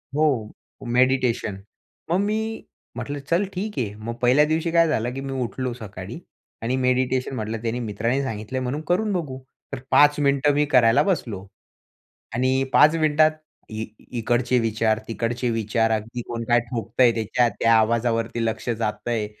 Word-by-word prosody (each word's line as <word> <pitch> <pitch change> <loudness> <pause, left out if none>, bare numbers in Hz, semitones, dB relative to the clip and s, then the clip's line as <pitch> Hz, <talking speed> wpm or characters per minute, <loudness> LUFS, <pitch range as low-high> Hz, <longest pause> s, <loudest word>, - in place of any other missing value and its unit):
हो 155 +1 +3 0.7
मेडिटेशन. 125 -5 +2 0.5
मग 175 - +3
मी 220 +2 -2 0.3
म्हटलं 145 0 -4
चल 175 +4 +2
ठीक 205 +3 -3
आहे. 105 -5 -2
मग 110 +2 -6
पहिल्या 130 +5 +5
दिवशी 160 +2 0
काय 170 0 +4
झालं 120 -5 -1
की 135 - -5
मी 135 0 -5
उठलो 125 +2 -3
सकाळी 105 - -8 0.4
आणि 120 +3 0
मेडिटेशन 130 0 0
म्हटलं 110 -1 -4
त्यांनी 115 +1 -2
मित्रांनी 115 +4 -1
सांगितलंय 120 0 -4
म्हणून 130 +4 -3
करून 205 +4 +1
बघू. 150 -8 -3 0.3
तर 135 - -3
5 145 0 +5
मिनिटं 140 0 +3
मी 145 +1 +2
करायला 125 +2 +5
बसलो 115 - -2 0.9
आणि 130 +3 +1
5 155 +2 +6
मिनिटात 155 -1 +4 0.4
ई 110 0 -4 0.3
इकडचे 120 +2 +1
विचार, 110 -1 +1
तिकडचे 120 +2 -2
विचार 115 0 0
अगदी 110 +2 -2
कोण 115 -1 -4
काय 120 0 +4
ठोकतंय, 120 +1 +2
त्याच्या 115 +2 +1
त्या 115 0 +4
आवाजावरती 115 +1 +1
लक्ष 110 +2 -3
जातंय. 110 0 -2
125 Hz, 150 wpm, -23 LUFS, 115-140 Hz, 0.9 s, 5